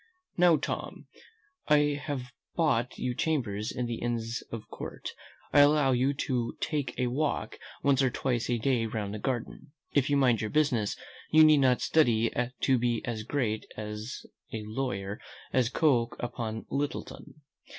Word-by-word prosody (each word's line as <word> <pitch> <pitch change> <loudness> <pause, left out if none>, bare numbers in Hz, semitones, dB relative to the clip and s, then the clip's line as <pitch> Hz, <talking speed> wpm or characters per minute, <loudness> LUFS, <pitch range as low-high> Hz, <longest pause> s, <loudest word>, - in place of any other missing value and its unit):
"Now, 175 -2 +5
Tom, - - -5 0.6
I 145 -1 +3
have 130 -4 -4 0.2
bought 130 -7 +1
you 125 - -1
chambers 120 -9 -1
in 125 -2 -2
the 120 -1 -4
inns 115 -1 -2
of 115 -2 -6
court. - - -7 0.4
I - - +7
allow 145 -1 +5
you 130 +2 +2
to 120 -3 -1
take 140 -5 -2
a 125 - +1
walk 140 +5 -1 0.2
once 140 -1 +4
or 130 - +3
twice 125 -1 -1
a 120 - +2
day 115 -1 +1
round 105 -2 -3
the 105 - -4
garden. 130 +4 -4 0.2
If 140 -1 +2
you 145 - +3
mind 125 -4 +3
your 110 - -2
business, 130 -8 +1 0.3
you 155 0 +7
need 155 -1 +7
not 130 -2 +3
study 115 -7 +3 0.3
to 130 -2 +3
be 120 -1 0
as 115 -3 -3
great 110 -2 -2
a 105 0 -4 0.6
lawyer 105 -2 -3 0.3
as 125 -2 +3
Coke 125 -5 +2
upon 115 -2 -4
Littleton. 145 +1 -4
125 Hz, 155 wpm, -29 LUFS, 115-145 Hz, 0.6 s, I